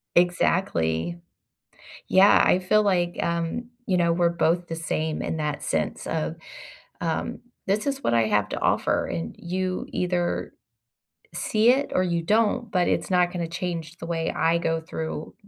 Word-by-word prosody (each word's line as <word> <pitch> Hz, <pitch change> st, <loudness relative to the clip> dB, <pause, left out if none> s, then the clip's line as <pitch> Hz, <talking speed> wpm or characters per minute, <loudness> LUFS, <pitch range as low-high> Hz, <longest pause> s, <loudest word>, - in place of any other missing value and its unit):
Exactly. 170 Hz, -, +1 dB, 0.9 s
Yeah 195 Hz, +2 st, +6 dB
I 180 Hz, -, +5 dB
feel 215 Hz, +3 st, +3 dB
like 175 Hz, -3 st, +1 dB
um, 170 Hz, +8 st, -2 dB, 0.2 s
you 185 Hz, -3 st, +2 dB
know, 170 Hz, -1 st, +3 dB
we're 170 Hz, 0 st, +3 dB
both 170 Hz, +1 st, +1 dB
the 165 Hz, -, -4 dB
same 160 Hz, -1 st, -2 dB
in 160 Hz, -, -3 dB
that 150 Hz, -1 st, -3 dB
sense -, -, -2 dB
of, 160 Hz, 0 st, -2 dB, 0.6 s
um, -, -, -2 dB, 0.3 s
"This 210 Hz, +7 st, 0 dB
is 275 Hz, 0 st, -2 dB
what -, -, +1 dB
I 115 Hz, -1 st, +3 dB
have 105 Hz, -1 st, +1 dB
to -, -, -3 dB
offer, -, -, +1 dB
and 80 Hz, -1 st, -4 dB
you 185 Hz, +1 st, -3 dB
either, 175 Hz, -, -1 dB, 0.8 s
see 215 Hz, +6 st, +3 dB
it 275 Hz, +3 st, +1 dB
or 185 Hz, -, +3 dB
you 170 Hz, -2 st, 0 dB
don't, 220 Hz, +3 st, +1 dB
but 180 Hz, -2 st, +2 dB
it's -, -, 0 dB
not 180 Hz, 0 st, +3 dB
gonna 170 Hz, -2 st, -2 dB
change 170 Hz, -1 st, -5 dB
the 165 Hz, -, -7 dB
way 165 Hz, -1 st, -1 dB
I 165 Hz, +1 st, +2 dB
go 165 Hz, -1 st, 0 dB
through 160 Hz, -2 st, -6 dB
175 Hz, 165 wpm, -25 LUFS, 165-185 Hz, 0.9 s, Yeah